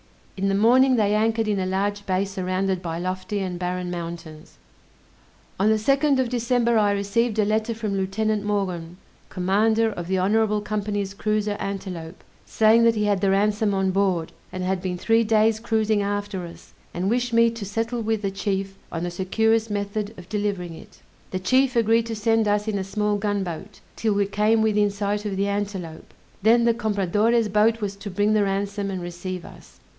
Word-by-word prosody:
In 195 0 -1
the 195 - +1
morning 255 +5 +5
they 210 -3 +2
anchored 225 +1 +1
in 205 -2 0
a 185 - -1
large 200 +2 -2
bay 190 +1 +1
surrounded 190 -1 -2
by 165 -2 -4
lofty 185 +4 -3
and 185 -3 -3
barren 180 0 -3
mountains. 165 -2 -7 1.0
On 205 +3 +3
the 220 - +4
2nd 275 +6 +2
of 260 -2 +1
December 235 -1 +1
I 205 -1 +3
received 210 +3 0
a 215 - +3
letter 220 +2 0
from 215 -3 -3
Lieutenant 205 +2 -1
Maughn, 180 -5 -2 0.3
commander 215 +5 +2
of 175 -4 -6
the 190 +1 0
Honorable 210 +3 +2
Company's 205 -1 -3
cruiser 210 0 -1
Antelope, 185 -4 -6 0.2
saying 220 +1 +4
that 230 -1 +4
he 210 - 0
had 200 -2 +1
the 200 - +2
ransom 205 +1 +2
on 190 0 +1
board, 185 -4 0 0.2
and 185 0 -4
had 185 0 -1
been 180 -1 -3
three 225 +5 +3
days 220 0 +3
cruising 220 -2 +1
after 200 -2 -3
us, 170 - -14 0.2
and 180 +2 -1
wished 245 +3 0
me 230 0 +4
to 230 -2 -7
settle 225 +4 -2
with 220 -1 -1
the 195 - 0
chief 195 0 -3
on 165 0 -3
the 175 - -2
securest 220 +5 +1
method 205 +1 -3
of 180 -1 -11
delivering 200 -5 -2
it. - - -14 0.3
The 185 - -3
chief 255 +7 +2
agreed 230 0 +3
to 225 - -3
send 225 +1 +2
us 205 +1 +1
in 205 -2 -1
a - - -2
small 210 +2 -1
gunboat, 200 -2 -3 0.2
'till 220 -2 0
we 200 0 +2
came 210 +3 +2
within 210 -1 +3
sight 205 +1 -2
of 200 -2 -3
the 200 +1 +1
Antelope; 200 -5 -4 0.3
then 230 +3 +5
the 235 0 +4
Compradore's 215 +1 +1
boat 215 +2 +3
was 200 -1 -3
to 200 - -7
bring 205 +3 +1
the 215 - +3
ransom 200 +1 -2
and 185 -2 -4
receive 175 +1 -6
us. - - -15
205 Hz, 190 wpm, -24 LUFS, 190-220 Hz, 1.0 s, morning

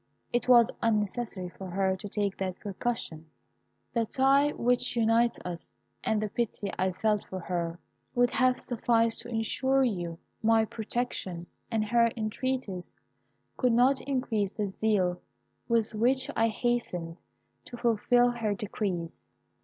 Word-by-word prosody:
It 240 0 +1
was 240 -2 +7
unnecessary 210 -3 0
for 190 +1 -9
her 190 +1 +1
to 200 +2 -8
take 200 -1 -1
that 185 -1 -3
precaution. 195 -6 -4 0.7
The 230 -2 +1
tie 275 +4 +4
which 245 +1 +1
unites 230 +1 +3
us, 170 -8 -7 0.3
and 220 - +1
the 215 0 -2
pity 210 -3 -2
I 190 +1 +2
felt 210 +2 +1
for 190 - -6
her, 170 -1 -2 0.4
would 245 0 +4
have 255 -2 +3
sufficed 230 -1 +1
to - - -10
ensure 260 +4 +1
you 175 -8 -2 0.2
my 225 0 +4
protection, 215 -6 -3 0.2
and 220 -2 0
her 235 +2 +4
entreaties 215 -3 -3 0.6
could 250 -3 +3
not 255 +3 +4
increase 235 -7 -1
the 210 - -2
zeal 190 -3 0 0.5
with 230 -2 +1
which 255 +5 +2
I 225 - +3
hastened 215 -8 -2 0.5
to 240 - -8
fulfil 245 +1 +3
her 225 -4 -1
decrees. 190 -5 -3
220 Hz, 140 wpm, -29 LUFS, 190-240 Hz, 0.7 s, was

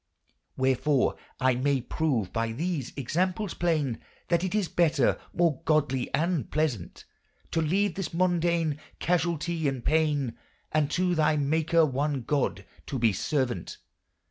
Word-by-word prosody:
• 130 0 +3
•••••• - - -16
Wherfore 140 -4 +3 0.2
I 130 0 +3
may 135 +2 +1
prove 125 - -1
by 115 0 -1
these 155 -1 -2
examples 180 - -1
playne 155 -8 0 0.3
That 170 0 +2
it 185 +2 -1
is 205 -4 +1
better 160 -7 +2
more 165 -4 +1
godly 145 -6 +1
and 165 - 0
plesant 145 - -2 0.5
To 165 - +1
leve 190 +5 +1
this 190 +1 -3
mondayne 170 -3 +1 0.2
casualte 170 -2 0
and 135 -3 -3
payne 145 -6 +1 0.3
And 155 -2 +2
to 180 +3 +1
thy 155 -2 +2
maker 160 +3 +3
one 140 -1 -1
god 140 +3 -1 0.2
to 135 - -3
be 115 -3 +3
servaunt. 130 - -2
155 Hz, 145 wpm, -28 LUFS, 135-170 Hz, 0.5 s, •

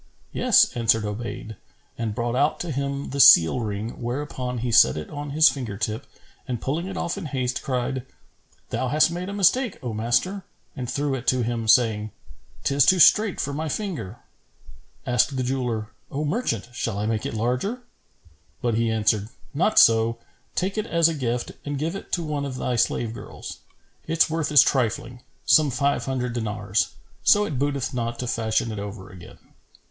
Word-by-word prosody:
"Yes," - - +4
answered 115 -2 +2
Obayd 110 0 -6 0.4
and 110 -3 -3
brought 120 +1 -2
out 145 +4 +1
to 175 - -4
him 140 0 -3
the 140 - -4
seal 85 -4 +8
ring; 110 +1 -4
whereupon 125 0 -4
he 120 +1 -2
set 65 - +6
it 75 - -7
on 145 0 -6
his 155 +3 +5
finger 120 -9 -2
tip 110 +4 -3 0.4
and 125 -3 -3
pulling 160 +9 -2
it 190 -1 -6
off 175 +3 -2
in 190 - -7
haste, 130 -3 -2
cried, 130 0 -2 0.7
"Thou 125 +3 -1
hast 150 +5 +3
made 180 +2 -4
a - - -4
mistake, 205 +4 +2
O 120 -3 -3
master;" 120 - 0 0.3
and 125 -2 -5
threw 140 +1 -1
it 130 -2 -5
to 130 -1 +2
him, 115 -1 -2
saying, 110 -2 +3 0.5
"'Tis 140 -1 +3
too 185 - +6
strait 205 +4 +5
for 140 - -2
my 155 +2 -3
finger." 160 - -4 0.9
Asked 125 +3 +1
the 130 - 0
jeweller, 125 -4 -2 0.2
"O 145 +3 -3
merchant, 145 - -2
shall 115 -3 -3
I 105 - -2
make 110 -1 -1
it - - -5
larger?" 125 - -2 0.8
But 120 -1 0
he 115 +1 +1
answered, 110 -1 +1 0.2
"Not 180 +9 +1
so; 115 0 +5 0.4
take 195 +3 -1
it 215 - -3
as 170 -1 +3
a - - -2
gift 125 -4 -2
and 145 -1 -4
give 160 +6 -2
it 195 - -9
to 175 - 0
one 150 -2 -3
of 135 -2 -5
thy 125 -1 -2
slave 115 0 0
girls. - - -9 0.5
Its 165 0 +2
worth 160 -2 -1
is 145 -4 +8
trifling, 125 -1 -1 0.2
some 155 -2 +5
five 140 +2 0
hundred 125 -2 -2
dinars; 105 -4 -1 0.3
so 210 0 +5
it 145 -10 -4
booteth 140 -1 -1
not 120 -1 -3
to 125 - -4
fashion 115 -1 -1
it 105 - -5
over 100 -1 -8
again." 90 -1 -13
125 Hz, 185 wpm, -24 LUFS, 115-150 Hz, 0.9 s, seal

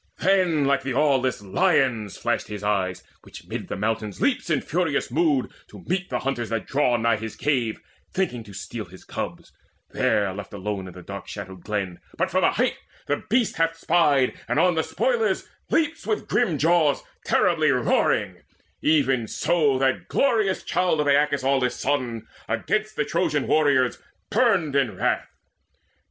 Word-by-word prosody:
Then 180 -6 +2
like 140 0 +2
the 130 -2 -3
aweless 130 -6 +2
lion's 110 +2 +1
flashed - - -1
his 105 -1 -7
eyes, 95 -3 -1 0.2
Which - - -13
mid - - -5
the - - -4
mountains 110 0 -2
leaps 275 -9 0
in 155 -4 +2
furious 160 -6 -1
mood 150 -2 +1 0.2
To - - -13
meet 185 +2 -2
the 125 - -1
hunters 120 -5 -2
that 115 -1 -2
draw 135 -3 +2
nigh 115 -1 +2
his 110 +1 -6
cave, 125 -6 0 0.3
Thinking 125 -12 -1
to 105 - -12
steal 100 +4 -6
his 90 +1 -15
cubs, - - -6 0.4
there 100 -2 +1
left 100 +1 -8
alone 100 -1 -4
In 90 0 -11
a 90 - -10
dark 100 +2 -8
shadowed 95 -3 -8
glen 100 -5 -3 0.2
but - - 0
from - - +2
a - - +5
height - - 0 0.3
The 145 - -1
beast 235 +1 +1
hath 165 0 +1
spied, 150 -6 +3
and - - 0
on 180 - +4
the 160 - +1
spoilers 475 - 0 0.2
leaps 325 0 0
With 430 - -1
grim 165 -5 +1
jaws 160 -2 +3 0.2
terribly 155 -3 +3
roaring; 125 -3 +1 0.4
even 135 -6 +2
so 150 -3 +1
That 130 0 0
glorious 220 -8 +1
child 180 -4 +1
of 150 - +2
Aeacus' 145 -1 +3
aweless 135 -2 +1
son 125 -5 -1 0.2
Against 215 - -1
the 150 - 0
Trojan 160 -4 0
warriors 140 -5 +2 0.3
burned 200 - +2
in 125 -9 +1
wrath. - - 0
135 Hz, 165 wpm, -24 LUFS, 110-165 Hz, 0.4 s, a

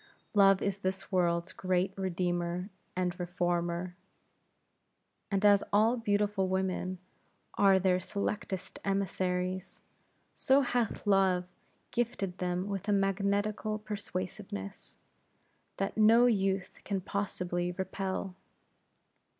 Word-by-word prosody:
Love 195 -2 +5
is 200 0 -1
this 190 +1 -3
world's 170 -2 +1
great 185 +1 0
redeemer 180 0 -2 0.2
and 180 0 -1
reformer; 175 0 -1 1.3
and 200 0 +1
as 205 -1 +6
all 220 +4 +4
beautiful 205 -3 +1
women 185 0 -1 0.6
are 200 -1 +5
her 185 -1 +3
selectest 190 0 -4
emissaries, 185 -1 -1 0.5
so 275 0 +4
hath 245 -4 -1
Love 190 -3 +3 0.5
gifted 200 -6 -2
them 180 +1 -1
with 200 0 -4
a - - +2
magnetical 200 +2 +1
persuasiveness, 195 - -6 0.8
that 195 0 -2
no 225 +3 +6
youth 195 -5 +1
can 195 -1 -1
possibly 180 -2 -2
repel. 190 0 -3
190 Hz, 100 wpm, -31 LUFS, 180-205 Hz, 1.3 s, as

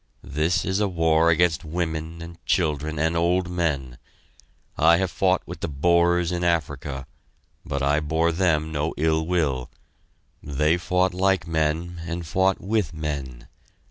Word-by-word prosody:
This 80 +5 0
is 95 +1 0
a 105 - +2
war 80 -2 +3
against 85 0 +2
women 80 0 -4
and 85 0 -11
children 75 -3 0
and 80 +2 +1
old 90 +2 +1
men. 70 -8 -2 0.8
I 85 +1 +5
have 95 -1 -1
fought 95 -1 +1
with - - -8
the - - -3
Boers 85 +3 +2
in 90 0 -2
Africa, 70 -5 -1 0.6
but 70 0 -3
I 70 +2 +3
bore 80 +2 +1
them 80 -3 +1
no 75 +1 -2
ill 80 +1 +1
will 75 -8 0 0.7
they 75 +3 +1
fought 90 +1 +1
like 95 -1 +1
men 80 +2 -1
and 85 0 -4
fought 95 +4 +1
with 100 -6 -1
men. 70 -6 -5
80 Hz, 145 wpm, -24 LUFS, 75-90 Hz, 0.8 s, I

